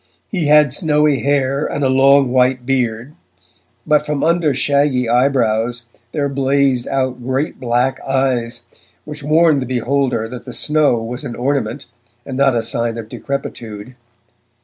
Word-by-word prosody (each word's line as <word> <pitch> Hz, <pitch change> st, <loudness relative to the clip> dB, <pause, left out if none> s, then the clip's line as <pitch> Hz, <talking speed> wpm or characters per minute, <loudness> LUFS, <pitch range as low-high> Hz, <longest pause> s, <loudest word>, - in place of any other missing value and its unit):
He 175 Hz, -8 st, -1 dB
had 150 Hz, -2 st, +5 dB
snowy 150 Hz, -4 st, +2 dB
hair 140 Hz, 0 st, 0 dB
and 145 Hz, -, -3 dB
a -, -, +3 dB
long 135 Hz, 0 st, +4 dB
white 125 Hz, 0 st, +2 dB
beard, 125 Hz, 0 st, -1 dB, 0.7 s
but 150 Hz, -1 st, +3 dB
from 150 Hz, -2 st, -2 dB
under 165 Hz, -2 st, +2 dB
shaggy 140 Hz, -2 st, +1 dB
eyebrows 120 Hz, -2 st, +1 dB, 0.3 s
there 145 Hz, -2 st, -1 dB
blazed 135 Hz, -2 st, +1 dB
out 130 Hz, -2 st, -2 dB
great 130 Hz, +4 st, -2 dB
black 125 Hz, +2 st, 0 dB
eyes 130 Hz, -3 st, -1 dB, 0.4 s
which 150 Hz, -1 st, -8 dB
warned 155 Hz, 0 st, +3 dB
the 130 Hz, -, -4 dB
beholder 130 Hz, -2 st, -1 dB
that 120 Hz, +1 st, -9 dB
the 125 Hz, -, -8 dB
snow 145 Hz, -2 st, +2 dB
was 120 Hz, +2 st, -6 dB
an 120 Hz, -, -6 dB
ornament 130 Hz, -3 st, -2 dB, 0.4 s
and 135 Hz, -, -6 dB
not 135 Hz, -1 st, +3 dB
a 115 Hz, -, 0 dB
sign 115 Hz, 0 st, -1 dB
of 110 Hz, -1 st, -7 dB
decrepitude. 115 Hz, -5 st, -6 dB
135 Hz, 150 wpm, -17 LUFS, 120-140 Hz, 0.7 s, had